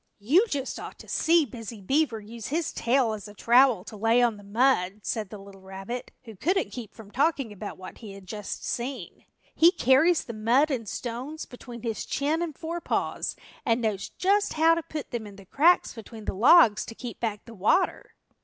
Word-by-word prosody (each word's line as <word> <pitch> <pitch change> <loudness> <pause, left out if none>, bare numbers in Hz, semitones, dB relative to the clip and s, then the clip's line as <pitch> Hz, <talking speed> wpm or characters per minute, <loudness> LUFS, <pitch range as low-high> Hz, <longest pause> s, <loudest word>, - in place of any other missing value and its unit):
"You 305 - +3
just 275 -5 -3
ought - - -8
to - - -13
see 330 -1 +3
Busy 230 -3 -8
Beaver 255 +3 +1
use 220 +1 -8
his 320 +2 -2
tail 240 -2 +2
as 210 -2 -7
a 205 - -13
trowel 240 -3 +4
to 220 - -10
lay 225 +3 +3
on 235 -3 +2
the 205 - -13
mud," 210 -2 +1
said 210 +2 -3
the 210 - -8
little 195 -1 -13
rabbit, 195 +6 -7
who 225 -3 -11
couldn't 350 - 0
keep 225 -4 -8
from 215 -3 -13
talking 275 -4 0
about 205 +1 -7
what 185 0 -10
he 215 -4 -9
had 195 -1 -12
just 210 +2 -6
seen. 240 -5 -5 0.3
"He 335 +2 +6
carries 310 +3 +4
the 235 - -7
mud 240 +8 +2
and 230 -6 -3
stones 255 +6 -5
between 245 -1 -11
his 225 -2 -3
chin 300 +4 -1
and 320 -5 -4
forepaws 335 +1 -2 0.3
and 230 +1 +2
knows 215 -2 -2
just 400 +2 +1
how 325 +1 +5
to 335 - 0
put 310 -2 -7
them 230 -3 -4
in 200 - -12
the 195 -1 -14
cracks 330 - +3
between 225 -1 -10
the - - -2
logs 225 - +6
to 225 - -8
keep 245 0 -8
back 215 -3 -3
the 230 - -11
water." 220 - +1
235 Hz, 200 wpm, -27 LUFS, 210-285 Hz, 0.3 s, He